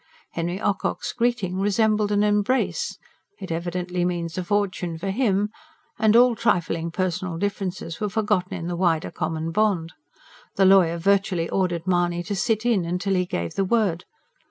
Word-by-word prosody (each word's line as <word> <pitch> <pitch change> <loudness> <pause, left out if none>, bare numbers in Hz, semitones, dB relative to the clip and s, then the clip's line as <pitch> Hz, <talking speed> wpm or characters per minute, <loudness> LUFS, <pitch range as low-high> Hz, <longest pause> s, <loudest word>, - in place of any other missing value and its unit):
Henry 175 +3 -3
Ocock's 205 -2 -1
greeting 230 -7 0
resembled 210 +1 +2
an 205 0 +3
embrace 210 +5 0 0.4
"It 185 - -7
evidently 175 +1 -2
means 170 -2 -2
a 185 - -2
fortune 185 -4 -1
for 195 +4 -3
him" 205 -3 +1 0.5
and 220 0 +4
all 245 0 +6
trifling 170 -7 0
personal 180 -1 -2
differences 190 -3 -3
were 210 - 0
forgotten 205 -3 0
in 165 - -5
the 175 0 -2
wider 170 -3 +1
common 160 +1 -3
bond. 185 -4 +1 0.6
The 195 - +4
lawyer 185 -3 +5
virtually 190 -2 +1
ordered 175 -3 0
Mahony 175 -1 +1
to 200 +4 -3
"sit 215 +3 0
in", 180 -7 +1
till 195 +1 -1
he 180 -1 +1
gave 85 - -3
the 195 - 0
word. 190 -4 +1
185 Hz, 155 wpm, -24 LUFS, 170-205 Hz, 0.6 s, all